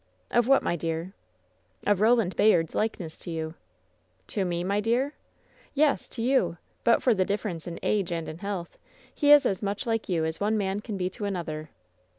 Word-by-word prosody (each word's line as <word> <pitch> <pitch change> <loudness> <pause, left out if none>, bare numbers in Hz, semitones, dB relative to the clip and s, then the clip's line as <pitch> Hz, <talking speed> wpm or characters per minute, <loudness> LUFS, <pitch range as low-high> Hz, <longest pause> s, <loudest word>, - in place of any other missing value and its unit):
"Of 240 -1 +3
what, 270 0 +5
my - - 0
dear?" 165 +2 -3 0.7
"Of 205 -1 +2
Roland 220 -4 +3
Bayard's 170 -7 +4
likeness 195 -7 -2
to - - -8
you!" 160 -1 -3 0.8
"To 200 - -1
me, 175 -1 -1
my 200 +3 +1
dear?" 240 +7 +1 0.6
"Yes, 295 0 +2
to 230 - -5
you! 230 -10 +2 0.3
But 235 - +4
for 250 - +5
the 190 -3 +2
difference 195 -4 -3
in 170 - -5
age 200 -4 +1
and 165 -1 -2
in 160 - -7
health, 195 -4 -5 0.3
he 290 -1 +3
is 295 -1 +8
as 190 - 0
much 200 0 -2
like 225 -3 -1
you 165 -3 +1
as 160 0 -3
one 215 +2 +1
man 195 -1 -1
can 210 -1 -5
be 180 -1 0
to 205 - -5
an 200 -1 -1
other!" 155 -3 -5
195 Hz, 195 wpm, -27 LUFS, 170-225 Hz, 0.8 s, is